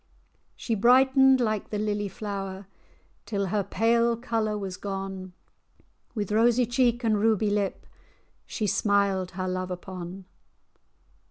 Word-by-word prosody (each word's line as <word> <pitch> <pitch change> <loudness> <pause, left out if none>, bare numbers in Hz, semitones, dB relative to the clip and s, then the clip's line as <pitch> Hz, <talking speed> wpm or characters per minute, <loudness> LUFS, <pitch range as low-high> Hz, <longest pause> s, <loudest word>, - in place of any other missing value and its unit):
She 230 - -3
brightened 265 +4 +5
like 215 -4 -1
the 210 - -3
lily 205 -1 -1
flower, 195 -1 -6 0.6
Till 200 -3 -1
her 205 +1 0
pale 230 +3 +2
colour 225 -3 -1
was 195 -3 -5
gone; 195 -1 -6 0.8
With 210 -2 -3
rosy 235 +3 +3
cheek, 240 0 +1
and 215 -2 +2
ruby 215 -1 +2
lip, 205 -1 -1 0.6
She 215 - -3
smiled 200 -2 +1
her 185 0 -2
love 185 0 -3
upon. 185 0 -7
210 Hz, 120 wpm, -26 LUFS, 195-230 Hz, 0.8 s, brightened